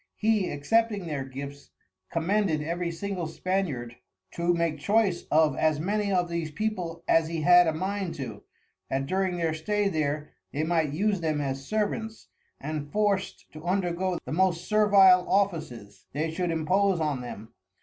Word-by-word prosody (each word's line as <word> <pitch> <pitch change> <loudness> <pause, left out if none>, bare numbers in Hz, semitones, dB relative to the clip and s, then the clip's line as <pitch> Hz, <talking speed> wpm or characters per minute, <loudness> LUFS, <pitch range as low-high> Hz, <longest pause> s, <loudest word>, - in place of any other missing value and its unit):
He, 215 -3 +1
accepting 205 +7 +1
their 150 -5 -3
Gifts, 140 +2 -8 0.4
commended 170 -1 +1
every 170 +2 -2
single 180 0 -4
Spaniard 155 -10 -2 0.3
to 170 +1 0
make 170 -3 0
choice 200 +1 +1
of 155 -2 +4
as 155 0 +1
many 205 +4 0
of 180 -2 +2
these 170 -2 -3
People, 175 -1 -3
as 165 -1 +4
he 165 -1 -3
had 175 +1 +7
a - - +3
mind 190 +2 -3
to, 115 -7 -6 0.5
that 135 +1 -1
during 185 +3 0
their 165 -2 0
stay 205 +6 0
there, 150 -2 -2 0.2
they 145 +2 -1
might 160 -3 +1
use 195 +4 0
them 155 -2 0
as 135 -1 -3
Servants, 220 +1 -2 0.3
and 145 0 -5
forced 205 -2 0
to 155 0 -10
undergo 180 0 0
the - - -6
most 175 0 +1
servile 200 -4 +6
Offices 155 - -1
they 155 +3 -1
should 175 +2 -2
impose 180 +4 +2
on 150 -5 -1
them. 110 -3 -9
170 Hz, 160 wpm, -27 LUFS, 155-195 Hz, 0.5 s, had